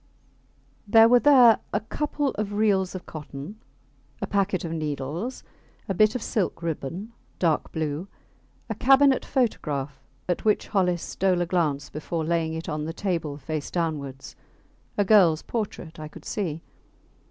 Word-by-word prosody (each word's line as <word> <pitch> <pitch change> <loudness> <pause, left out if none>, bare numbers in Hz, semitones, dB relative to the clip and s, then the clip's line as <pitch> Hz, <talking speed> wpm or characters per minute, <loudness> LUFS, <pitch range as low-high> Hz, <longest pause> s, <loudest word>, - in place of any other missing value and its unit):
There 225 +2 +7
were 245 +1 +6
there 250 -5 +7
a 205 - +1
couple 290 +5 -2
of 210 -4 -3
reels 200 -3 +1
of 185 - -7
cotton, 155 +6 -8 0.6
a - - -2
packet 195 -2 0
of 165 - -4
needles, 155 - -4 0.4
a 195 - 0
bit 215 +4 +3
of 245 - -2
silk 185 -5 -1
ribbon, 170 - -4 0.2
dark 165 -4 +1
blue; 155 +3 -3 0.6
a 225 - -2
cabinet 270 +4 +4
photograph, 150 - -1 0.3
at 180 - -1
which 215 -1 +1
Hollis 180 -4 +1
stole 185 -2 0
a - - +1
glance 165 -5 -1
before 160 +1 -3
laying 160 -1 0
it 160 - -6
on 150 -1 -3
the 165 - -4
table 165 -6 -2
face 150 +1 -4
downwards. 145 -6 -3 0.6
A 205 - +3
girls 185 -6 +5
portrait, 200 -8 -5
I 155 - -6
could 150 - -13
see. 165 -6 -3
180 Hz, 150 wpm, -25 LUFS, 155-215 Hz, 0.6 s, There